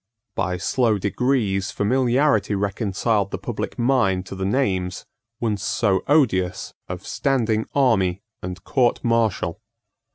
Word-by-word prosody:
By 90 Hz, -1 st, -1 dB
slow 110 Hz, +4 st, +1 dB
degrees 100 Hz, -1 st, 0 dB
familiarity 125 Hz, 0 st, +2 dB
reconciled 100 Hz, +1 st, 0 dB
the -, -, -4 dB
public -, -, -5 dB
mind 115 Hz, -7 st, +2 dB
to 95 Hz, -, -7 dB
the 95 Hz, 0 st, -2 dB
names, 95 Hz, -6 st, -1 dB, 0.3 s
once 105 Hz, -4 st, -1 dB
so 100 Hz, -1 st, +1 dB
odious, 110 Hz, -, +1 dB
of 90 Hz, +2 st, -6 dB
standing 115 Hz, -6 st, 0 dB
army 100 Hz, -9 st, +2 dB, 0.2 s
and 90 Hz, 0 st, -6 dB
court 125 Hz, -4 st, +1 dB
martial. 110 Hz, -5 st, 0 dB
105 Hz, 120 wpm, -22 LUFS, 95-125 Hz, 0.3 s, familiarity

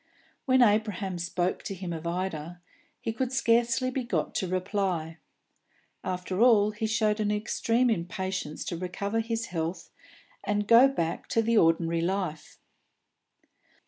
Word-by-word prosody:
When 260 Hz, -1 st, +5 dB
Abraham 205 Hz, -4 st, +1 dB
spoke 175 Hz, +1 st, -1 dB
to 195 Hz, -, -5 dB
him 180 Hz, -2 st, -5 dB
of 165 Hz, 0 st, -5 dB
Ida, 175 Hz, -1 st, -4 dB, 0.4 s
he 225 Hz, -, -3 dB
could 255 Hz, +2 st, -2 dB
scarcely 240 Hz, 0 st, +2 dB
be 255 Hz, 0 st, -2 dB
got 240 Hz, -, -2 dB
to 190 Hz, -, -1 dB
reply. 185 Hz, -3 st, -2 dB, 0.8 s
Above 185 Hz, 0 st, -4 dB
all, 215 Hz, -4 st, +5 dB
he 220 Hz, +1 st, -3 dB
showed 215 Hz, -1 st, +1 dB
an 210 Hz, -1 st, 0 dB
extreme 230 Hz, +3 st, +1 dB
impatience 185 Hz, -3 st, -3 dB
to 170 Hz, -, -3 dB
recover 200 Hz, +5 st, -2 dB
his 230 Hz, 0 st, -2 dB
health 165 Hz, +1 st, -3 dB, 0.5 s
and 205 Hz, 0 st, -1 dB
go 235 Hz, +4 st, +8 dB
back 170 Hz, -12 st, -3 dB
to 225 Hz, -, +1 dB
the 230 Hz, +1 st, +1 dB
ordinary 165 Hz, 0 st, +2 dB
life. 180 Hz, -3 st, -3 dB
200 Hz, 140 wpm, -28 LUFS, 175-225 Hz, 0.8 s, go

